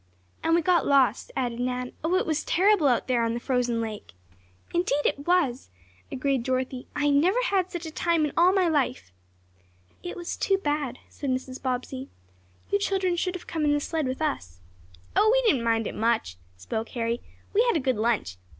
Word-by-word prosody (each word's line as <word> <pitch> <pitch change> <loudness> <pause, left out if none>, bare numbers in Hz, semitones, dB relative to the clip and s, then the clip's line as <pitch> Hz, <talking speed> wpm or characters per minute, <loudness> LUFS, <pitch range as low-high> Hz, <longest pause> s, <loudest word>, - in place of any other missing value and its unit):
"And 330 - +2
we 340 - +2
got 355 0 +3
lost," 265 -5 +3
added 245 -2 -2
Nan. 250 0 -2
"Oh, 335 +3 +1
it - - +2
was 315 -2 -1
terrible 375 -3 +3
out 245 -3 +2
there 245 -2 +2
on 230 0 0
the - - -2
frozen 245 -2 0
lake!" 215 - -6 0.6
"Indeed 320 -4 +1
it 285 +2 -1
was," 315 - +1 0.4
agreed 270 -1 0
Dorothy. 255 +1 -2
"I 290 0 +2
never 345 +11 +3
had 380 -6 +1
such 345 -2 -6
a 320 - -6
time 335 -1 +1
in 295 - -3
all 350 +2 +5
my 380 -2 +2
life." 265 - 0 0.9
"It 355 - -6
was 345 -1 -4
too 390 - +2
bad," 295 -7 -2
said 280 - -5
Mrs. 255 0 -3
Bobbsey. 260 +1 -3 0.6
"You 405 - +3
children 385 -3 0
should 365 +1 -1
have 360 - -8
come 320 -2 -3
in 295 -1 +3
the 290 - +2
sled 310 -1 -2
with 260 +4 -3
us." 90 - -3 0.6
"Oh, 435 - +5
we - - +4
didn't 285 - +3
mind 225 -1 +2
it - - -4
much," 220 - 0 0.2
spoke 155 - -4
Harry. 230 +1 -1 0.3
"We 430 +3 +4
had 475 -8 +3
a - - +1
good 260 -4 0
lunch. 215 - 0
280 Hz, 195 wpm, -26 LUFS, 245-345 Hz, 0.9 s, all